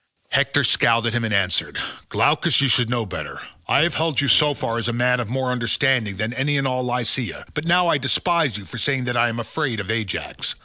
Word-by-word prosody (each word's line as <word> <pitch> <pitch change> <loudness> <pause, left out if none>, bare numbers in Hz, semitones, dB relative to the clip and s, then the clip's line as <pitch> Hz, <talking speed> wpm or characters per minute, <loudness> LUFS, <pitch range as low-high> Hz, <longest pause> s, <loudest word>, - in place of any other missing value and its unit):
Hector - - +2
scowled 115 0 +3
at 115 - 0
him 120 -1 0
and 110 - -2
answered, 100 -2 0 0.3
"Glaucus, - - +2
you 140 - +3
should 120 -1 +2
know 120 -2 -1
better. 95 - -7 0.3
I - - +3
have 170 -1 +1
held 160 -3 0
you 140 - +1
so 150 -2 +4
far 115 -2 -3
as 115 - -2
a 120 - -1
man 125 +1 +2
of 120 -3 -4
more 130 0 -1
understanding 120 -3 0
than 110 +3 -2
any 140 +3 0
in 135 - 0
all 130 -1 0
Lycia, 125 -1 -2
but 150 - -4
now 175 +1 +3
I 155 - +2
despise 140 - +1
you 100 - -10
for 120 - -8
saying 135 +1 0
that 125 0 -2
I 120 0 +3
am 115 0 -4
afraid 125 -1 -3
of 105 +1 -3
Ajax. 110 -5 -4
125 Hz, 230 wpm, -21 LUFS, 115-140 Hz, 0.3 s, so